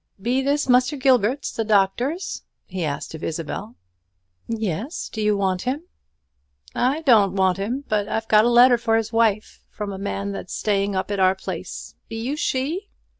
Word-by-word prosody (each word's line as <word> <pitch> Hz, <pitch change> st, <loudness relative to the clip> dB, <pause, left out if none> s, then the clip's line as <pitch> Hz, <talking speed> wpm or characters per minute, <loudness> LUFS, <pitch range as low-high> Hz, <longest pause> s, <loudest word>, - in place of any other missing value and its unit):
"Be 245 Hz, +6 st, 0 dB
this 285 Hz, +2 st, 0 dB
Muster 255 Hz, +3 st, +3 dB
Gilbert's 260 Hz, 0 st, +2 dB
the 225 Hz, -, -2 dB
doctor's?" 220 Hz, -, 0 dB, 0.2 s
he 185 Hz, -2 st, -4 dB
asked 145 Hz, 0 st, -4 dB
of 160 Hz, -, -8 dB
Isabel. 155 Hz, -8 st, -4 dB, 0.7 s
"Yes; 225 Hz, -, -3 dB
do 220 Hz, -, -3 dB
you 210 Hz, -1 st, +2 dB
want 190 Hz, -2 st, 0 dB
him?" 270 Hz, +6 st, -2 dB, 0.9 s
"I 265 Hz, +6 st, +1 dB
doan't 215 Hz, -9 st, +5 dB
want 190 Hz, -2 st, +2 dB
him; 240 Hz, +8 st, -2 dB
but 210 Hz, -2 st, 0 dB
I've 225 Hz, 0 st, -2 dB
got 215 Hz, 0 st, +5 dB
a 240 Hz, -, +3 dB
letter 240 Hz, 0 st, +6 dB
for 225 Hz, -1 st, +2 dB
his 225 Hz, 0 st, -3 dB
wife, 220 Hz, -2 st, +1 dB
from 205 Hz, -2 st, -5 dB
a 190 Hz, -, -7 dB
man 200 Hz, 0 st, -3 dB
that's 195 Hz, -2 st, -6 dB
staying 200 Hz, -1 st, 0 dB
up 190 Hz, +2 st, -2 dB
at 200 Hz, -, -1 dB
our 190 Hz, 0 st, +4 dB
place. 190 Hz, -, -7 dB, 0.2 s
Be 225 Hz, -, -6 dB
you 255 Hz, +6 st, -2 dB
she?" 305 Hz, +8 st, -2 dB
220 Hz, 175 wpm, -23 LUFS, 195-255 Hz, 0.9 s, letter